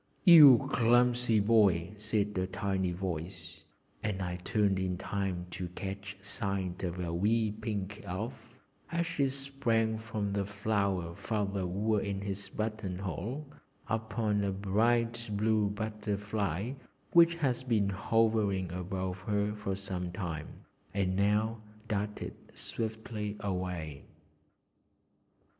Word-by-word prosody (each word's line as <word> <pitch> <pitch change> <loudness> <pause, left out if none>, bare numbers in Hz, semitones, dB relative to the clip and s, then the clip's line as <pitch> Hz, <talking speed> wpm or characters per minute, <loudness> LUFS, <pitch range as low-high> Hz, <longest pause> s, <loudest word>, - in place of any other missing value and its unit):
"You 150 - +10
clumsy 120 -1 +4
boy!" 100 -5 +4
said 105 -1 -1
a 95 0 0
tiny 95 -1 -1
voice, 85 -2 -5 0.4
and 105 -3 -2
I 90 -1 -3
turned 100 +1 +1
in 90 -1 -1
time 95 -2 -2
to 90 0 -4
catch 100 +1 -5
sight 100 -3 -2
of 90 -1 -3
a 85 -2 -2
wee 110 +5 +2
pink 105 -2 -4
Elf 110 +5 -6 0.3
as 170 0 +1
she 150 -5 +1
sprang 120 -5 0
from 110 -3 -3
the 100 0 +1
flower 100 -4 -1
Father 100 -1 -2
wore 105 +3 +1
in 100 -1 -2
his 100 0 -4
button 110 -4 -3
hole 100 - -4 0.4
upon 110 -2 0
a 100 - 0
bright 115 +4 +1
blue 105 0 +2
butterfly 105 -1 -2 0.4
which 170 0 +7
had 130 -6 0
been 105 -5 +2
hovering 105 -3 +1
above 90 +1 -3
her 105 +1 0
for 105 -2 -3
some 95 -2 -4
time, 85 -5 -5 0.3
and 95 -2 +1
now 105 +3 +2 0.3
darted 105 -1 -2 0.2
swiftly 110 -2 -4
away. 90 -7 -3
100 Hz, 120 wpm, -31 LUFS, 95-110 Hz, 0.4 s, You